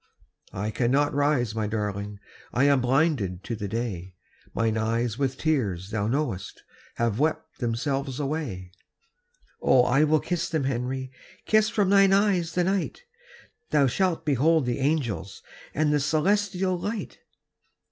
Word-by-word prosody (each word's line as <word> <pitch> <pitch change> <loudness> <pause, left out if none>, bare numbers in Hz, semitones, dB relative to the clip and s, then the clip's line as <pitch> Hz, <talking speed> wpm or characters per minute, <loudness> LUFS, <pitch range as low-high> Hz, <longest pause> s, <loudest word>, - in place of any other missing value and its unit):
"I 105 +3 -2
cannot 135 +6 +1
rise, 140 -6 +1
my 110 -1 -1
darling, 105 -1 -3 0.3
I 125 - +1
am 140 -2 +4
blinded 125 - +1
to 115 +2 -4
the 100 -1 -4
day. 95 -5 -4 0.4
Mine 115 -1 0
eyes 115 +2 -1
with 135 -1 0
tears, 105 - -1
thou 105 -2 -1
knowest, 115 -7 -3 0.3
Have 115 -1 0
wept 155 +2 -1
themselves 135 +3 -2
away." 135 - -3 0.9
"Oh, 125 - +5
I 135 +4 +3
will 155 0 +3
kiss 175 +1 -2
them, 160 -4 -1
Henry, 130 0 -2 0.3
Kiss 215 0 +3
from 205 -4 +1
thine 195 -1 +6
eyes 195 -5 +2
the 180 - +3
night. 195 - -1 0.7
Thou 145 -2 +4
shalt 180 +5 0
behold 150 +1 +3
the 125 +1 -1
angels 120 - -1 0.3
And 150 0 +2
the 150 - +3
celestial 185 +5 +1
light." 210 +4 -5
135 Hz, 140 wpm, -26 LUFS, 115-160 Hz, 0.9 s, thine